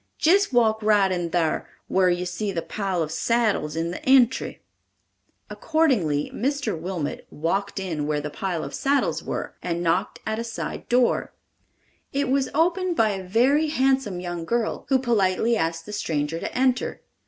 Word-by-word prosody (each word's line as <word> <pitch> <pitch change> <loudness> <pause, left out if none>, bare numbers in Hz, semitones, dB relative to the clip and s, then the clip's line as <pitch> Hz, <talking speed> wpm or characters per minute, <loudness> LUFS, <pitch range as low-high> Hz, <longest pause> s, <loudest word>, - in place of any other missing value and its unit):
Jist 390 +3 +4
walk 225 -3 +3
right 205 -3 +3
in 175 -2 -1
thar, 165 -2 0 0.2
whar 185 -1 +3
you 175 0 0
see 180 +3 -3
the 170 -3 -3
pile 190 -5 -2
of 155 - -5
saddles 215 -7 0
in 165 +1 -1
the - - -7
entry." 260 -1 +3 0.8
Accordingly, 235 - +1
Mr. 280 +2 -1
Wilmot 165 -2 -4
"walked 195 +6 -2
in 160 -6 -3
where 150 -1 0
the 150 0 -5
pile 180 -2 -3
of - - -7
saddles 280 0 0
were," - - -4
and 170 -1 -2
knocked 180 +4 0
at 220 0 -2
a - - -2
side 230 -1 -6
door. 245 0 +2 0.8
It 280 -1 -1
was 270 0 +1
opened 355 +3 +2
by 225 -6 +3
a 190 -1 -4
very 255 +11 +3
handsome 265 - +1
young 175 -1 -4
girl, 235 +5 -2
who 270 - +5
politely 230 -2 +2
asked 165 -4 -1
the 210 - -8
stranger 160 -4 -2
to - - -4
enter. 255 -1 0
205 Hz, 165 wpm, -24 LUFS, 170-255 Hz, 0.8 s, who